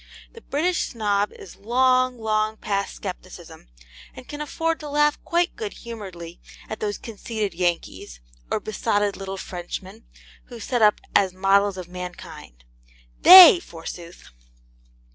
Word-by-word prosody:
The 460 Hz, -, -13 dB
British 345 Hz, +3 st, -1 dB
Snob 205 Hz, -3 st, -1 dB
is 185 Hz, -, -13 dB
long, 255 Hz, +3 st, +1 dB
long 215 Hz, -1 st, -1 dB
past 200 Hz, -2 st, -4 dB
scepticism, -, -, -9 dB, 0.5 s
and 255 Hz, -, -12 dB
can 295 Hz, 0 st, -7 dB
afford 325 Hz, +2 st, -2 dB
to 300 Hz, -, -8 dB
laugh 295 Hz, +1 st, +1 dB
quite 345 Hz, +1 st, 0 dB
good 435 Hz, -2 st, -6 dB
humouredly 185 Hz, -8 st, -10 dB, 0.3 s
at 220 Hz, -, -7 dB
those 205 Hz, -1 st, -3 dB
conceited 215 Hz, -2 st, -5 dB
Yankees, 170 Hz, -, -3 dB, 0.3 s
or -, -, -1 dB
besotted 205 Hz, -1 st, -1 dB
little 195 Hz, 0 st, -7 dB
Frenchmen, 185 Hz, +4 st, -8 dB, 0.4 s
who 240 Hz, -2 st, -11 dB
set 245 Hz, +2 st, -2 dB
up 210 Hz, -1 st, +4 dB
as 190 Hz, -2 st, +2 dB
models 195 Hz, +1 st, +2 dB
of 180 Hz, -2 st, -7 dB
mankind. 175 Hz, -, -10 dB, 0.6 s
THEY 365 Hz, 0 st, +11 dB
forsooth! 170 Hz, -, -11 dB
210 Hz, 130 wpm, -23 LUFS, 185-255 Hz, 0.6 s, THEY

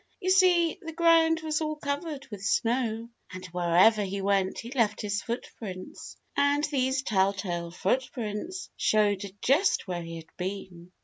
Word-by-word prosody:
You 370 Hz, -, 0 dB
see, 360 Hz, -3 st, +4 dB
the 325 Hz, 0 st, -7 dB
ground 325 Hz, -1 st, +4 dB
was 310 Hz, 0 st, -1 dB
all 310 Hz, 0 st, -1 dB
covered 285 Hz, 0 st, -4 dB
with 200 Hz, -2 st, -7 dB
snow 230 Hz, +1 st, 0 dB, 0.2 s
and 185 Hz, -1 st, -8 dB
wherever 180 Hz, +5 st, +4 dB
he 200 Hz, 0 st, -3 dB
went 195 Hz, -1 st, +1 dB
he 235 Hz, -, -7 dB
left 230 Hz, -6 st, +1 dB
his 205 Hz, -1 st, -2 dB
footprints. 210 Hz, -5 st, -7 dB, 0.2 s
And 285 Hz, +1 st, +2 dB
these 265 Hz, -3 st, 0 dB
telltale 190 Hz, -5 st, 0 dB
footprints 240 Hz, -, -3 dB
showed 205 Hz, -2 st, +1 dB
just 290 Hz, -, +3 dB
where 175 Hz, -2 st, -3 dB
he 165 Hz, 0 st, -7 dB
had 160 Hz, -1 st, -11 dB
been. 180 Hz, -2 st, -6 dB
220 Hz, 145 wpm, -28 LUFS, 190-295 Hz, 0.2 s, see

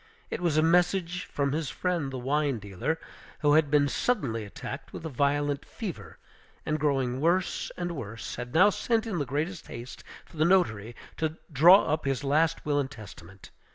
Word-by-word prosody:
It -, -, -3 dB
was 165 Hz, -4 st, +1 dB
a 155 Hz, -, +4 dB
message 180 Hz, +1 st, +2 dB
from 140 Hz, -1 st, -1 dB
his 150 Hz, -1 st, -2 dB
friend 175 Hz, -7 st, -2 dB
the 130 Hz, -, -4 dB
wine 140 Hz, +1 st, 0 dB
dealer, 100 Hz, -, -3 dB, 0.4 s
who 145 Hz, -2 st, +4 dB
had 155 Hz, -1 st, +4 dB
been 145 Hz, -1 st, +4 dB
suddenly 135 Hz, -, -1 dB
attacked 100 Hz, -4 st, -8 dB
with -, -, -8 dB
a -, -, -3 dB
violent 145 Hz, +1 st, 0 dB
fever, 200 Hz, -8 st, -7 dB, 0.5 s
and 155 Hz, 0 st, -1 dB
growing 135 Hz, -3 st, 0 dB
worse 175 Hz, +3 st, +1 dB
and 175 Hz, -1 st, -2 dB
worse, 115 Hz, -7 st, -6 dB
had 120 Hz, 0 st, -6 dB
now 195 Hz, +5 st, +7 dB
sent 225 Hz, +2 st, 0 dB
in 200 Hz, -7 st, -2 dB
the 145 Hz, -, -1 dB
greatest 155 Hz, +6 st, -3 dB
haste 120 Hz, +2 st, -9 dB, 0.2 s
for -, -, -16 dB
the 155 Hz, -, +3 dB
notary 120 Hz, -, +2 dB, 0.2 s
to 160 Hz, 0 st, -2 dB, 0.2 s
draw 175 Hz, +8 st, +8 dB
up 155 Hz, 0 st, -1 dB
his 135 Hz, 0 st, -1 dB
last 160 Hz, +4 st, +1 dB
will 145 Hz, -1 st, +1 dB
and 135 Hz, -2 st, -1 dB
testament. 100 Hz, -6 st, -12 dB
150 Hz, 185 wpm, -28 LUFS, 130-170 Hz, 0.5 s, draw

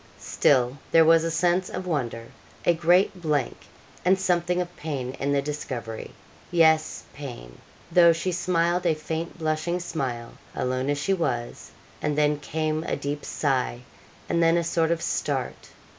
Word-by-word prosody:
Still 130 Hz, 0 st, +2 dB
there 165 Hz, -1 st, +6 dB
was 165 Hz, 0 st, +6 dB
a 165 Hz, -, 0 dB
sense 175 Hz, +2 st, +1 dB
of 185 Hz, 0 st, -5 dB
wonder 120 Hz, -9 st, -2 dB, 0.4 s
a 175 Hz, -, +5 dB
great 175 Hz, +3 st, +3 dB
blank, 150 Hz, -6 st, 0 dB, 0.5 s
and 185 Hz, +2 st, +4 dB
something 180 Hz, -1 st, +1 dB
of 175 Hz, 0 st, -4 dB
pain 135 Hz, -5 st, -4 dB
in 140 Hz, +1 st, 0 dB
the 140 Hz, -1 st, +1 dB
discovery 130 Hz, -6 st, -5 dB, 0.4 s
yes, 160 Hz, -2 st, +3 dB
pain 120 Hz, -, -9 dB, 0.3 s
though 170 Hz, 0 st, +7 dB
she 165 Hz, +3 st, -1 dB
smiled 175 Hz, 0 st, +1 dB
a 160 Hz, -, +3 dB
faint 160 Hz, +3 st, -5 dB
blushing 160 Hz, +2 st, -1 dB
smile 130 Hz, -9 st, -4 dB, 0.2 s
alone 130 Hz, +2 st, -1 dB
as 145 Hz, -, +1 dB
she 170 Hz, +7 st, 0 dB
was; 120 Hz, -10 st, -3 dB, 0.3 s
and 150 Hz, 0 st, -1 dB
then 150 Hz, -1 st, +2 dB
came 155 Hz, +1 st, -2 dB
a -, -, -1 dB
deep 145 Hz, +1 st, -4 dB
sigh; 130 Hz, -4 st, -1 dB, 0.5 s
and 170 Hz, -, +1 dB
then 165 Hz, 0 st, +4 dB
a 170 Hz, -, +1 dB
sort 165 Hz, -1 st, +1 dB
of 170 Hz, 0 st, 0 dB
start. 135 Hz, -4 st, -2 dB
160 Hz, 160 wpm, -25 LUFS, 140-170 Hz, 0.5 s, though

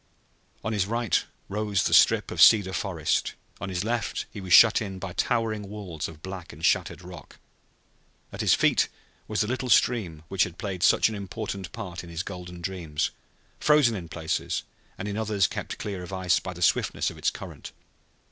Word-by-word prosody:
On 110 Hz, +2 st, -2 dB
his 100 Hz, -3 st, +1 dB
right 115 Hz, -2 st, +1 dB, 0.2 s
rose 105 Hz, -1 st, 0 dB
the -, -, 0 dB
strip -, -, +5 dB
of -, -, -1 dB
cedar 100 Hz, -3 st, +7 dB
forest; 85 Hz, -4 st, -1 dB, 0.2 s
on 100 Hz, -, -4 dB
his 90 Hz, 0 st, -2 dB
left 115 Hz, +1 st, -2 dB
he 100 Hz, -, -8 dB
was 95 Hz, -1 st, -7 dB
shut 110 Hz, +5 st, +8 dB
in 95 Hz, -3 st, -5 dB
by 95 Hz, -1 st, -6 dB
towering 110 Hz, -3 st, -1 dB
walls 95 Hz, -7 st, -5 dB
of 80 Hz, -1 st, -13 dB
black 95 Hz, -2 st, -7 dB
and 80 Hz, +4 st, -5 dB
shattered -, -, +1 dB
rock. 90 Hz, -4 st, -11 dB, 1.0 s
At -, -, -4 dB
his -, -, +5 dB
feet -, -, +3 dB, 0.4 s
was 110 Hz, 0 st, 0 dB
the 105 Hz, -, 0 dB
little 130 Hz, +1 st, -2 dB
stream 95 Hz, -12 st, +2 dB
which 95 Hz, -1 st, +2 dB
had 90 Hz, 0 st, -5 dB
played 95 Hz, -5 st, -4 dB
such -, -, +5 dB
an 110 Hz, -, -4 dB
important 100 Hz, -2 st, -5 dB
part 90 Hz, -3 st, -6 dB
in 85 Hz, -, -11 dB
his 85 Hz, +1 st, -4 dB
golden 90 Hz, -2 st, -8 dB
dreams, 85 Hz, -5 st, -2 dB, 0.5 s
frozen 150 Hz, -6 st, +4 dB
in 85 Hz, -4 st, -6 dB
places, 80 Hz, -2 st, -2 dB, 0.3 s
and 100 Hz, -, -5 dB
in 105 Hz, 0 st, -3 dB
others 105 Hz, -4 st, +1 dB
kept -, -, -4 dB
clear 100 Hz, -3 st, -5 dB
of 90 Hz, -, -8 dB
ice 95 Hz, -1 st, +2 dB
by 95 Hz, -, -6 dB
the 90 Hz, 0 st, -4 dB
swiftness -, -, +1 dB
of -, -, -13 dB
its -, -, +2 dB
current. -, -, -9 dB
95 Hz, 190 wpm, -26 LUFS, 90-105 Hz, 1.0 s, shut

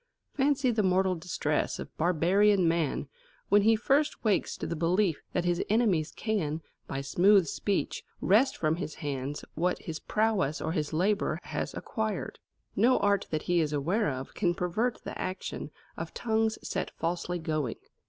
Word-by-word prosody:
Fancy 275 Hz, -2 st, +2 dB
the 220 Hz, -2 st, +1 dB
mortal 190 Hz, -1 st, +3 dB
distress 160 Hz, -3 st, -1 dB
of -, -, -8 dB
barbarian 180 Hz, +3 st, +3 dB
man 165 Hz, -4 st, 0 dB, 0.4 s
when 205 Hz, 0 st, +6 dB
he 225 Hz, +2 st, +5 dB
first 280 Hz, +7 st, +1 dB
wakes 215 Hz, -4 st, +1 dB
to -, -, -4 dB
the 170 Hz, -, -3 dB
belief 170 Hz, +1 st, +1 dB
that 180 Hz, -, 0 dB
his 175 Hz, 0 st, +1 dB
enemies 200 Hz, -8 st, +2 dB
can, 165 Hz, -8 st, -2 dB, 0.2 s
by 135 Hz, -, -3 dB
smooth 190 Hz, +7 st, +4 dB
speech, 195 Hz, +6 st, -2 dB, 0.2 s
wrest 225 Hz, +8 st, +3 dB
from 155 Hz, 0 st, +1 dB
his 175 Hz, -4 st, -5 dB
hands 140 Hz, 0 st, -4 dB
what 180 Hz, +3 st, 0 dB
his 160 Hz, -1 st, -5 dB
prowess 210 Hz, -9 st, 0 dB
or 160 Hz, -, -2 dB
his 155 Hz, -3 st, -1 dB
labour 195 Hz, +6 st, +1 dB
has -, -, -4 dB
acquired. 220 Hz, -4 st, -3 dB, 0.4 s
No 240 Hz, +6 st, +4 dB
art 200 Hz, -1 st, +2 dB
that 155 Hz, -1 st, -2 dB
he 175 Hz, -1 st, +2 dB
is 155 Hz, -2 st, 0 dB
aware 165 Hz, +7 st, +1 dB
of 130 Hz, -1 st, -5 dB
can 175 Hz, -4 st, +1 dB
pervert 215 Hz, +8 st, 0 dB
the -, -, -6 dB
action 185 Hz, +1 st, -4 dB, 0.3 s
of -, -, -6 dB
tongues 220 Hz, -1 st, +1 dB
set -, -, -2 dB
falsely 175 Hz, +1 st, -2 dB
going. 155 Hz, -7 st, -2 dB
180 Hz, 165 wpm, -29 LUFS, 160-210 Hz, 0.4 s, when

